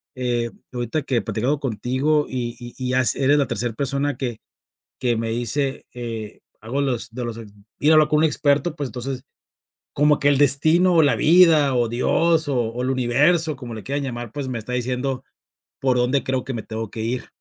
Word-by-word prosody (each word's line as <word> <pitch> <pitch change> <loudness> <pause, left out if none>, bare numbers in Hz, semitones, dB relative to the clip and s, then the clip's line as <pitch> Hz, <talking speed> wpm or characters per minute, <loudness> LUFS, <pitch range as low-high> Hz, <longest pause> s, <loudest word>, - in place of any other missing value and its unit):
eh, 120 -2 -1 0.2
ahorita 120 +5 -2
que 125 -4 0
platicando 125 +8 -1
contigo 135 +5 0
y 120 -2 -3
y 120 0 -9
y 130 -1 -3
ya 130 0 +3
s 130 - +3
eres 145 +2 +4
la 140 - +2
tercer 115 0 -3
persona 140 +1 -1
que 120 -4 -4 0.6
que 120 -2 +1
me 115 0 -2
dice, 130 +4 -2
eh, 115 -3 -6 0.2
hago 125 +6 -2
los 125 -4 -2
de 125 0 -5
los 115 -1 -5 0.4
ir 150 - +3
a - - +7
hablar 155 -1 +5
con 150 - +2
un 160 - +3
experto, 150 +1 +1
pues, 145 -4 -3
entonces 130 +1 -5 0.7
como 150 0 +3
que 145 - +2
el 140 -2 +3
destino 155 +6 +4
o 165 - +5
la 145 - +3
vida 155 -4 +5
o 120 -2 +1
Dios 155 +6 +1
o 135 - 0
o 120 +1 -2
el 130 - -1
universo 145 +6 +2
como 125 -3 -8
le 110 - -7
quieran 140 +1 -2
llamar, 120 -3 -5
pues, 145 -1 -4
me 125 - -3
está 110 +3 -7
diciendo 125 +1 -2 0.6
por 130 -2 +2
dónde 125 +3 +1
creo 130 -1 -1
que 135 - -5
me 110 - -4
tengo 110 -1 -5
que 110 - -7
ir. 120 +3 -2
130 Hz, 205 wpm, -22 LUFS, 120-145 Hz, 0.7 s, a